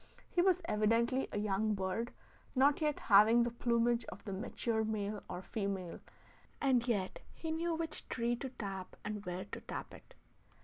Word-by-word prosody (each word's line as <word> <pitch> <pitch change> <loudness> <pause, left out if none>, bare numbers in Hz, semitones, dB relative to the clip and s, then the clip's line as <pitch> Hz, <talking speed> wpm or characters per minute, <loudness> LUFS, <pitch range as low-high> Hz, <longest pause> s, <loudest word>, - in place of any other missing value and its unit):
He 350 - +3
was 370 0 +4
evidently 230 +3 +2
a - - -2
young 210 +1 +1
bird 195 +5 -2 0.4
not 280 +4 +4
yet 300 -2 +1
having 220 +3 +7
the 240 - -1
plumage 235 0 +2
of 190 - -9
the 200 - -3
mature 220 +3 -1
male 210 -1 -2
or 180 +1 -5
female, 195 -5 -3 0.6
and 255 -3 +3
yet 200 -6 0 0.2
he 320 - -4
knew 330 +1 0
which 325 -1 -4
tree 240 0 0
to 265 - -4
tap 195 -6 -6
and 210 -1 -3
where 180 +1 -3
to - - -7
tap - - -6
it. - - -14
225 Hz, 170 wpm, -35 LUFS, 200-255 Hz, 0.6 s, having